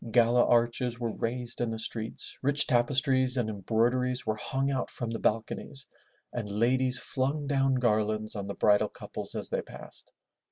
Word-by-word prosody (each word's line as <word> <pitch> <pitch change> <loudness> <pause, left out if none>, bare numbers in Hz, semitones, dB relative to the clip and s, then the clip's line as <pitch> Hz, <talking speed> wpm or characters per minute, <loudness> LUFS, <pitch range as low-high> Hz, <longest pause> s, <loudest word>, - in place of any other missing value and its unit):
Gala 120 +1 +4
arches 120 0 +1
were 115 -2 -3
raised 120 +1 -2
in 120 - 0
the 115 - -3
streets, 110 0 -4
rich 140 +2 +5
tapestries 130 0 +2
and 120 -3 0
embroideries 120 +5 0
were 110 -1 0
hung 135 +5 -1
out 130 -2 -2
from 120 -2 -5
the 115 - -3
balconies, 115 +5 -1 0.5
and 110 -4 -4
ladies 125 +5 +2
flung 140 +4 -2
down 135 -1 +2
garlands 110 -3 +1
on 100 -1 -4
the 100 - -5
bridal 105 -1 +3
couples - - -7
as - - -4
they - - 0
passed. - - -11
120 Hz, 165 wpm, -29 LUFS, 110-130 Hz, 0.5 s, rich